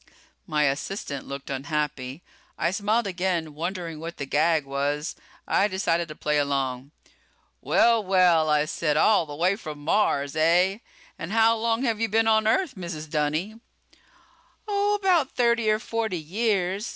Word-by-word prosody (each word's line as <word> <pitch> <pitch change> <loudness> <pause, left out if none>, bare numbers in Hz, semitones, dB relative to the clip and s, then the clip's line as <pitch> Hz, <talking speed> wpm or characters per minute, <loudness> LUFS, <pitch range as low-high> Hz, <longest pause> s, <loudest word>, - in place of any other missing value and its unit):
My 150 -1 +1
assistant 140 +1 -3
looked 140 0 -7
unhappy. 140 0 -3 0.3
I 170 - 0
smiled 210 +4 0
again, 180 -4 -2
wondering 170 0 -4
what 165 +1 -7
the 140 - -4
gag 155 +2 +2
was. 145 +2 -2 0.3
I 200 - +3
decided 170 -4 0
to 155 - -9
play 150 0 0
along. 135 -2 -2 0.7
"Well, 230 -2 +3
well," 180 -4 +3
I 150 0 +3
said, 150 -1 -1
"all 175 -2 +4
the 145 - -7
way 180 +5 +2
from 155 -8 -8
Mars, 145 -3 0
eh? 175 +5 +3 0.4
And 165 - -6
how 225 +1 +4
long 230 +2 0
have 230 -4 0
you 225 - +1
been 225 +2 +2
on 220 -1 +3
Earth, 300 +6 +1
Mrs. 170 -5 -7
Dunny?" 155 +8 -1 1.1
"Oh, 410 0 +1
about 365 -8 +1
thirty 235 -2 +2
or 215 - +3
forty 225 -4 -3
years. 195 +3 -1
175 Hz, 150 wpm, -25 LUFS, 150-220 Hz, 1.1 s, all